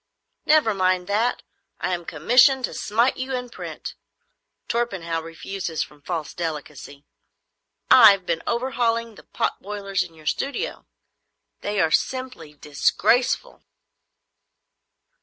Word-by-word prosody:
"Never 300 -8 +4
mind 185 -2 +1
that. 215 +5 0 0.4
I 185 - -1
am 175 -1 -4
commissioned 250 - +4
to - - -8
smite 230 +5 +1
you 260 0 -3
in 250 -1 -5
print. - - -7 0.7
Torpenhow 190 -9 -2
refuses 165 +1 -4
from 150 -1 -16
false 160 0 -4
delicacy. 150 -4 -6 0.9
I've 200 -6 +8
been 165 -1 -1
overhauling 235 -2 0
the - - -14
pot - - -2
boilers 200 -1 -3
in 170 -2 -13
your 155 -1 -17
studio. 275 - -3 0.7
They 205 0 -2
are 160 -3 +2
simply 250 - -2
disgraceful." 240 - +1
195 Hz, 115 wpm, -23 LUFS, 165-240 Hz, 0.9 s, I've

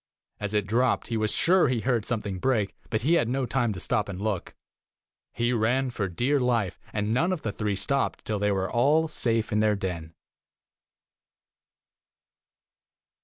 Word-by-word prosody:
As 105 0 -3
it 105 -2 +1
dropped, 120 +5 +1
he 115 - -1
was 110 -1 +1
sure 180 -1 +4
he 125 -3 0
heard 120 -3 0
something 105 -5 -2
break, 110 -4 0
but 110 - -1
he 150 +8 +2
had 120 -9 +3
no 130 +1 0
time 120 -1 0
to 90 - -7
stop 105 +1 0
and 95 - -5
12 105 +2 0
look. 90 - -8 0.8
He 120 +2 0
ran 125 +3 +1
for 105 -4 -2
dear 125 +11 +1
life, 120 -7 0
and 105 +1 -1
none 170 +9 +2
of 180 -5 -3
the 110 - -1
three 105 -1 -2
stopped 135 +8 -1
till 105 -2 -2
they 105 0 +1
were 95 -1 0
all 145 +8 +3
safe 115 -7 0
in 105 - +2
their 105 -1 +3
den." 85 -5 -5
115 Hz, 175 wpm, -27 LUFS, 105-125 Hz, 0.8 s, sure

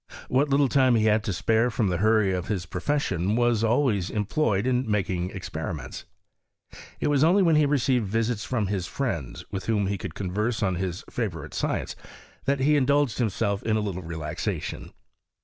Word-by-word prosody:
What 140 +3 +2
little 140 0 +4
time 130 -2 +4
he 110 -1 +2
had 110 0 +3
to 105 - -1
spare 110 +6 +2
from 110 -4 0
the 90 - 0
hurry 110 -1 +3
of 90 -1 -3
his 100 -5 -2
profession 95 - -1
was 120 -2 +2
always 115 -5 +2
employed 105 0 0
in 125 -2 0
making 95 -4 0
experiments. 80 -7 -6 0.9
It - - 0
was 145 -1 +3
only 185 +5 +5
when 165 -3 +4
he 150 -1 +4
received 130 -5 +1
visits 115 +1 -1
from 120 -5 -1
his 95 -3 -2
friends, 85 - -4
with 95 - -5
whom 105 -3 +1
he 100 0 -2
could - - -6
converse 105 +5 -2
on 95 -3 +1
hia 95 -1 -2 0.2
favourite 80 -10 -4
science, - - -2 0.5
that 140 0 +1
he 150 +2 +4
indulged 140 -3 +2
himself 100 -3 0
in 110 -1 0
a - - 0
little 95 -3 -3
relaxation. 80 -3 -4
110 Hz, 180 wpm, -26 LUFS, 95-130 Hz, 0.9 s, only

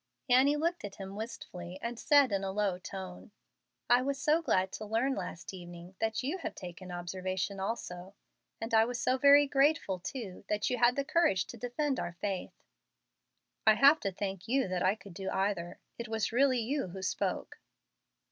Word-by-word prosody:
Annie 265 +3 +5
looked 335 +4 -1
at 205 -1 -6
him 195 0 -8
wistfully, 185 -5 -7
and 235 +1 -5
said, 285 -5 +5
in 195 -1 0
a 195 - -2
low 195 -2 0
tone, 185 +1 -8 0.6
"I 245 +1 +5
was 275 +1 -2
so 305 +4 +3
glad 190 - +1
to - - -6
learn, 230 +6 +1
last 180 -4 -6
evening, 175 0 -10
that 220 +2 -1
you 300 +9 -2
had 320 -2 -5
taken 180 0 -9
an 175 - -4
observation 185 +2 -3
also, 190 -2 -5 0.4
and 225 +1 -5
I 220 0 +7
was 245 +1 -3
so 255 +2 +1
very 285 +1 +7
grateful, 275 - +2
too, 190 0 -6
that 210 +3 0
you 250 - -1
had 245 +1 +5
the 280 - -1
courage 310 - +2
to - - -9
defend 255 +4 -1
our 175 - -3
faith." 190 +1 -5 1.0
"I 215 - +8
have 280 +6 +7
to 195 - -2
thank 190 -1 -5
you 265 -1 +2
that 180 -1 -1
I 185 +2 +3
could 200 -4 -13
do 190 +2 -4
either. 190 -3 -1 0.2
It 235 - -4
was 220 -1 -1
really 255 +1 +3
you 270 +1 -1
who 190 +1 -8
spoke." 185 - -2
215 Hz, 190 wpm, -31 LUFS, 185-260 Hz, 1.0 s, I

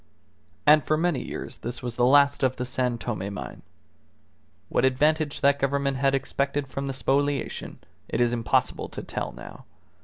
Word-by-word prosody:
And 150 +1 +7
for 155 - +1
many 170 -3 +1
years - - -7
this 120 +1 -6
was 120 -2 -4
the 120 0 +3
last 140 +1 +5
of 130 -1 +2
the 125 - -3
San 125 -1 -1
Tome 105 -4 -4
mine. 100 - -7 1.1
What - - 0
advantage 150 +3 +2
that 140 0 +4
Government 140 0 0
had 135 +1 +2
expected 140 +1 -1
from 135 +1 -4
the 135 - -2
spoliation, 140 +1 -1 0.3
it - - -1
is 120 0 +3
impossible 115 -2 0
to - - -7
tell - - -4
now. - - -11
135 Hz, 165 wpm, -26 LUFS, 125-145 Hz, 1.1 s, And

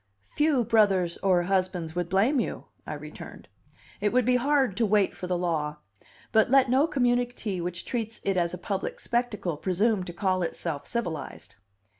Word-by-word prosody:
"Few 295 -5 +2
brothers 200 -6 +3
or 185 -3 +3
husbands 185 -3 -1
would 175 -1 -2
blame 220 +10 +3
you," - - -3 0.2
I - - -4
returned. - - -10 0.5
"It 205 0 +1
would 250 -1 +2
be 250 0 +4
hard 265 -5 +2
to 235 - +3
wait 205 -1 +2
for 180 - -6
the 180 -1 0
law. 155 -4 -1 0.5
But 220 +1 +4
let 265 -1 +4
no 275 +5 +4
community 245 - 0
which 175 0 -4
treats 225 -2 -3
it 195 - 0
as 170 -2 +1
a 180 - -4
public 195 +1 -4
spectacle 220 -9 -1
presume 195 +4 +1
to 175 - -6
call 185 0 0
itself 165 -4 -3
civilized." 155 - -4
195 Hz, 170 wpm, -27 LUFS, 175-240 Hz, 0.5 s, be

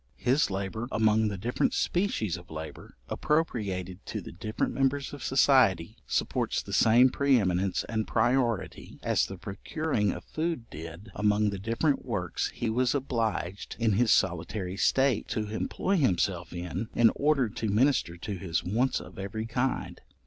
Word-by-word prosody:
His 130 +5 +2
labour, 100 +4 -3
among 110 0 +3
the 100 -2 -3
different 115 +6 0
species 170 - 0
of 90 0 -11
labour, 80 -4 -8
appropriated 100 - -1
to - - -3
the - - -9
different 110 +6 -3
members 135 +1 0
of 145 - -8
society, 125 - +3
supports - - 0
the - - -8
same 120 +3 +6
pre 140 -2 +3
eminence 95 -1 0
and 110 -1 -2
priority, 120 -1 0
as - - +2
the 95 - -7
procuring 105 - -2
of 90 - -7
food 155 - -3
did 85 +7 -9
among 105 +1 +2
the 100 - -5
different 115 +8 0
works 95 -9 -2
he 120 - -4
was 125 +4 +1
obliged, 115 -8 -2
in 115 -2 +2
his 110 +3 +2
solitary 90 +2 0
state, 130 +2 +2
to 105 -1 -2
employ 185 - -1
himself 90 - +1
in, 90 +4 -4
in 115 -1 +6
order 145 -4 +2
to 110 +1 -3
minister 110 -5 +2
to 100 +3 -5
his 85 -3 -1
wants 120 +8 +1
of - - -11
every 100 +3 -4
kind. 125 +3 -2
110 Hz, 155 wpm, -28 LUFS, 95-130 Hz, -, same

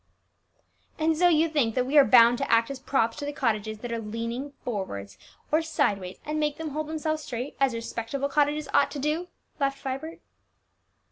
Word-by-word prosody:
"And 320 0 +2
so 355 +3 +4
you 325 -1 +4
think 280 -8 0
that 250 -1 +1
we 270 +4 -2
are 290 - +9
bound 240 -2 +6
to - - -2
act 230 +3 +4
as 275 - -6
props 245 -3 0
to 290 - -4
the - - -2
cottages 220 -7 -1
that 240 - -5
are 230 - -2
leaning 230 +5 -4
forwards 100 - -5 0.3
or 310 +2 +4
sideways, 195 - -1
and 305 +1 -2
make 300 -1 0
them 320 -1 -4
hold 305 +1 -3
themselves 310 0 -2
straight, 250 -1 -5
as 270 -3 +2
respectable 230 +4 -3
cottages 295 +1 +1
ought 285 - +4
to 290 - -7
do!" 305 +5 -1 0.3
laughed 275 -1 0
Vibert. 275 +5 -5
275 Hz, 190 wpm, -27 LUFS, 230-305 Hz, 0.3 s, are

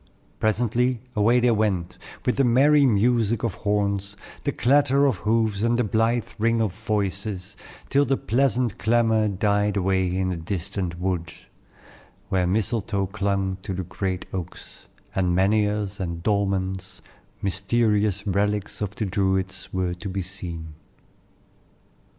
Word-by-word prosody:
Presently, 120 +3 +1 0.2
away 115 +4 +4
they 120 0 +3
went, 100 -6 0 0.3
with 125 - +1
the 135 - +4
merry 140 +4 +5
music 115 0 +2
of 115 -5 0
horns, 100 0 -1 0.3
the - - +2
clatter 140 +2 +3
of 130 -8 +2
hoofs, 110 0 +1
and 115 +1 +2
the 125 - +2
blithe 115 +2 +1
ring 115 +1 +2
of 110 -5 0
voices, 100 -2 -3 0.3
till 140 +1 +3
the 135 0 +1
pleasant 125 -1 +1
clamor 110 -1 +3
died 105 +1 +1
away 95 -1 +1
in 95 -1 0
the 90 - -2
distant 90 0 -4
woods, 90 -2 -3 0.8
where 90 -2 +1
mistletoe 100 0 0
clung 100 -1 -1
to 95 - -4
the 95 - -3
great 90 +1 -3
oaks, 90 -2 -8 0.3
and 90 -2 +1
menhirs 105 0 +1
and 85 -2 -4
dolmens, 95 -2 -1 0.4
mysterious 105 +1 +1
relics 105 +1 -1
of 105 0 -3
the 110 - -2
Druids, 95 -1 -1
were 90 -1 -1
to 90 +3 -6
be 95 0 -3
seen. 85 -4 -7
100 Hz, 135 wpm, -24 LUFS, 95-115 Hz, 0.8 s, merry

